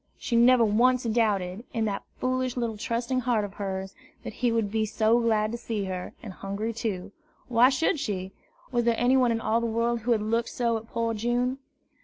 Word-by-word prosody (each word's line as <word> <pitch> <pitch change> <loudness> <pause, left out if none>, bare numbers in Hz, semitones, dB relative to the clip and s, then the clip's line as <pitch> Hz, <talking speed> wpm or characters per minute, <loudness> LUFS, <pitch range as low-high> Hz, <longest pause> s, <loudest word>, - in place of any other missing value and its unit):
She 235 - -2
never 240 0 +6
once 245 +4 +3
doubted, 215 -4 0
in 225 -1 +1
that 200 -2 -2 0.2
foolish 255 0 -1
little 235 -2 -1
trusting 235 +4 -1
heart 235 -4 +1
of 195 - -9
hers, 195 -1 -4 0.3
that - - -6
he 245 -1 +3
would 225 -3 0
be 220 0 0
glad 220 -1 +3
to 235 - -4
see 220 -3 -3
her, 185 -1 -5
and 205 -5 -7
Hungry 200 +4 -4
too. 200 -4 -4 0.4
Why 245 +1 +6
should 285 +3 +1
she? 190 -7 -3 0.4
Was 240 -2 +1
there 235 -1 +3
anyone 250 0 +3
in 225 - 0
all 225 +1 +1
the 235 - 0
world 230 +1 0
who 235 +2 -1
had 215 -2 0
looked 230 +2 0
so 235 -2 0
at 220 0 -9
poor 230 0 -1
June? 240 +4 0
230 Hz, 200 wpm, -27 LUFS, 210-240 Hz, 0.4 s, never